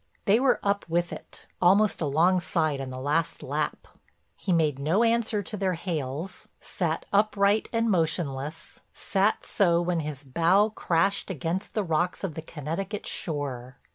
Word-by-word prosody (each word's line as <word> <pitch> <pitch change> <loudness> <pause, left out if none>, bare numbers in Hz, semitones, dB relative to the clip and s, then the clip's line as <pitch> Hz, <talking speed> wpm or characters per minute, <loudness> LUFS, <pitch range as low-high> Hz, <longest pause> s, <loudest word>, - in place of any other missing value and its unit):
They 215 +1 +5
were 260 -1 +3
up 200 0 +1
with 175 +1 0
it, - - -10 0.2
almost 195 +3 +4
alongside 160 -1 +2
on 135 - -5
the 130 - -6
last 150 +4 -1
lap. - - -3 0.5
He 195 - -3
made 155 -5 +2
no 165 +11 +2
answer 230 -2 +1
to 210 - -5
their 190 -3 0
hails, 160 0 -4
sat 165 -3 -2
upright 205 0 +3
and 230 0 +1
motionless, 160 -5 -1 0.2
sat 200 +2 0
so 170 -4 +3
when 175 -1 0
his 150 -2 -5
bow 170 +10 +3
crashed 195 0 0
against 175 +3 -3
the 215 - +1
rocks 175 +2 -1
of 190 -5 -2
the 160 - -6
Connecticut 165 +7 -5
shore. 135 -5 -4
175 Hz, 150 wpm, -27 LUFS, 155-200 Hz, 0.5 s, They